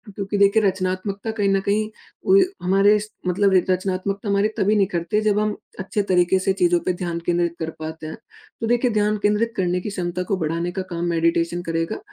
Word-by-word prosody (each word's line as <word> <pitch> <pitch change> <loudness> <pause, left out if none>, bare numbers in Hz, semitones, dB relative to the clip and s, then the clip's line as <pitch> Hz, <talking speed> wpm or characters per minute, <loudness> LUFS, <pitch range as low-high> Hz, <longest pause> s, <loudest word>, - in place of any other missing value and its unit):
क्योंकि 200 0 -3
देखिए 200 +2 +4
रचनात्मकता 190 +2 -1
कहीं 205 -3 0
न 195 - +3
कहीं 215 +2 0 0.4
उ 385 +1 +6 0.3
हमारे 195 +3 +4
स 210 - -7 0.2
मतलब 195 +2 +2
एक 185 0 +2
रचनात्मकता 190 +2 -1
हमारे 200 +1 +3
तभी 210 0 +2
निखरते 195 -1 0
हैं 215 - +1
जब 210 -1 +2
हम 210 0 0 0.2
अच्छे 200 +2 -1
तरीके 180 +1 +3
से 190 +1 +1
चीज़ों 175 0 +4
पे 185 - +1
ध्यान 170 -1 -2
केंद्रित 170 -1 0
कर 160 -1 -3
पाते 160 0 -6
हैं। 160 - -7 0.4
तो 225 - -1
देखिए 240 +1 +2
ध्यान 210 0 +1
केंद्रित 210 +3 +2
करने 180 -1 +1
की 210 - -4
क्षमता 180 -2 -3
को 195 - +1
बढ़ाने 165 +1 -2
का 190 - -3
काम 170 0 -2
मेडिटेशन 170 +1 +1
करेगा। 165 - -2
190 Hz, 205 wpm, -22 LUFS, 175-205 Hz, 0.4 s, उ